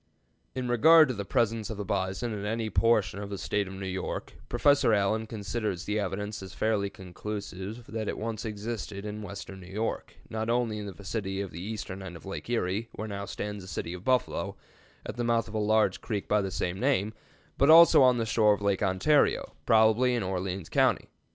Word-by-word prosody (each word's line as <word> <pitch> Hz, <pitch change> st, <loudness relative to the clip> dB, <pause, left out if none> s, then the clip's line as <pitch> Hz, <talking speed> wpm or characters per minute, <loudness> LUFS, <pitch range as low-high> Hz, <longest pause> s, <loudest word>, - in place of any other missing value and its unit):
In 130 Hz, -1 st, -2 dB
regard 155 Hz, +6 st, +7 dB
to -, -, 0 dB
the 100 Hz, -3 st, -5 dB
presence 115 Hz, -1 st, 0 dB
of 110 Hz, -, -5 dB
the 105 Hz, -, -4 dB
bison 95 Hz, +4 st, -2 dB
in 100 Hz, -1 st, -5 dB
any 110 Hz, +1 st, -2 dB
portion 105 Hz, -4 st, +2 dB
of 100 Hz, -, -6 dB
the 100 Hz, -, -4 dB
State 100 Hz, +1 st, -1 dB
of 95 Hz, -, -8 dB
New 95 Hz, 0 st, -6 dB
York, 95 Hz, 0 st, -4 dB, 0.2 s
Professor 140 Hz, -6 st, +4 dB
Allen 110 Hz, +2 st, +1 dB
considers 105 Hz, -3 st, -3 dB
the 105 Hz, +1 st, 0 dB
evidence 105 Hz, +1 st, -3 dB
as 95 Hz, +1 st, -9 dB
fairly 105 Hz, -2 st, 0 dB
conclusive 100 Hz, +3 st, -7 dB
that 110 Hz, -1 st, -4 dB
it -, -, -2 dB
once 110 Hz, -1 st, -4 dB
existed 105 Hz, -2 st, -5 dB
in 105 Hz, 0 st, -5 dB
western 100 Hz, -1 st, -8 dB
New 90 Hz, 0 st, -12 dB
York, 110 Hz, +3 st, -3 dB
not 110 Hz, 0 st, -3 dB
only 115 Hz, -3 st, 0 dB
in 105 Hz, -, -5 dB
the -, -, -5 dB
vicinity 95 Hz, 0 st, -4 dB
of 100 Hz, -2 st, -4 dB
the 85 Hz, -, -7 dB
eastern 100 Hz, -2 st, -5 dB
end 95 Hz, -2 st, -8 dB
of 85 Hz, -, -12 dB
Lake 95 Hz, +4 st, -6 dB
Erie, 115 Hz, -1 st, -1 dB
where 110 Hz, -, -5 dB
now 100 Hz, -1 st, -5 dB
stands 105 Hz, 0 st, -5 dB
the -, -, -11 dB
city 85 Hz, -2 st, -4 dB
of 90 Hz, 0 st, -8 dB
Buffalo, 130 Hz, 0 st, 0 dB, 0.5 s
at -, -, -6 dB
the 120 Hz, -, -1 dB
mouth 115 Hz, -1 st, +1 dB
of 110 Hz, -, -10 dB
a 110 Hz, -, 0 dB
large 105 Hz, -2 st, +2 dB
creek 105 Hz, -4 st, -3 dB
of 105 Hz, -1 st, +3 dB
the 95 Hz, -, -2 dB
same 90 Hz, 0 st, -2 dB
name, 115 Hz, -6 st, +1 dB, 0.5 s
but 140 Hz, -, +5 dB
also 165 Hz, -2 st, +9 dB
on 125 Hz, -2 st, +6 dB
the 115 Hz, -, 0 dB
shore 110 Hz, -2 st, +4 dB
of 105 Hz, -, -4 dB
Lake 100 Hz, -2 st, +1 dB
Ontario, 100 Hz, +10 st, +2 dB
probably 110 Hz, +3 st, +4 dB
in 120 Hz, -, -1 dB
Orleans 95 Hz, -1 st, -3 dB
County. -, -, +2 dB
105 Hz, 210 wpm, -28 LUFS, 95-115 Hz, 0.5 s, also